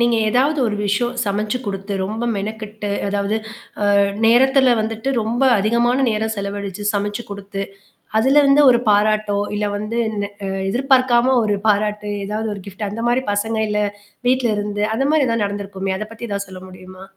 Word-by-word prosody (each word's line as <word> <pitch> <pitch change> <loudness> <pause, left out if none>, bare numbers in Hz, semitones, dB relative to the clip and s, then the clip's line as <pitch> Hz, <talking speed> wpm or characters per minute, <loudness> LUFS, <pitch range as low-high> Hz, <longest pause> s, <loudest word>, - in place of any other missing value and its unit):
நீங்க 235 -1 +3
எதாவது 280 +6 +2
ஒரு 210 -1 -1
விஷயம் 240 +5 0
சமைச்சு 210 +4 -1
கொடுத்து, 195 0 -4
ரொம்ப 220 +4 -3
மெனக்கெட்டு 215 0 -5 0.2
அதாவது, 200 +2 -1 0.6
அ - - +5 0.3
நேரத்தில 260 +2 +5
வந்துட்டு 225 +4 -2
ரொம்ப 235 +4 -1 0.2
அதிகமான 235 +5 +2
நேரம் 220 +1 -1
செலவழிச்சு 200 0 -5
சமைச்சு 205 +3 -2
கொடுத்து, 200 0 -5 0.6
அதில 275 +5 +4
வந்து 280 +2 +6
ஒரு 240 - +3
பாராட்டோ! 210 0 +2 0.2
இல்ல 210 0 -1
வந்து 210 +3 -4
இந்த 205 -1 -2 0.4
எதிர்பார்க்காம 255 0 +3
ஒரு 210 -1 +1
பாராட்டு 210 0 +1
ஏதாவது 215 +2 -3
ஒரு 200 - -9
கிஃப்ட் 200 +2 -5
அந்த 225 +3 -5
மாதிரி 250 +2 +1
பசங்க 220 +2 -1
இல்ல 210 - 0 0.5
வீட்ல 255 -2 +2
இருந்து 205 0 -2
அந்தமாரி 280 +5 +2
எதுனா 230 -2 0
நடந்திருக்குமே! 195 -1 -4
அத 215 - -4
பத்தி 230 +1 -7
எதாவது 200 0 -3
சொல்ல 185 -1 -10
முடியுமா? 185 0 -12
215 Hz, 155 wpm, -20 LUFS, 205-240 Hz, 0.6 s, வந்து